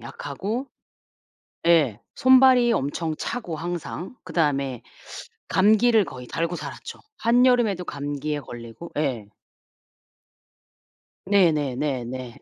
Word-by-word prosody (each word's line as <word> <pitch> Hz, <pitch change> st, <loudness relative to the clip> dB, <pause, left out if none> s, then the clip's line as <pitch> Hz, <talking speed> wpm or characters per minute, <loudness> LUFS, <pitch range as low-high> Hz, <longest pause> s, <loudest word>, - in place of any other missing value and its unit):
약하고 260 Hz, -, -5 dB, 1.0 s
예. 150 Hz, -11 st, +4 dB, 0.2 s
손발이 260 Hz, -2 st, +6 dB
엄청 155 Hz, +4 st, -2 dB
차고, 220 Hz, -10 st, -4 dB
항상. 175 Hz, +4 st, -5 dB
그다음에 140 Hz, -6 st, -1 dB, 0.7 s
감기를 215 Hz, +2 st, +4 dB
거의 125 Hz, -1 st, -9 dB
달고 170 Hz, +1 st, -2 dB
살았죠. -, -, -8 dB, 0.2 s
한여름에도 240 Hz, -5 st, +3 dB
감기에 145 Hz, 0 st, -4 dB
걸리고 120 Hz, +7 st, -10 dB
예. 130 Hz, -9 st, -1 dB, 2.0 s
네네네네. 135 Hz, -, 0 dB
165 Hz, 210 characters per minute, -24 LUFS, 135-220 Hz, 2.0 s, 손발이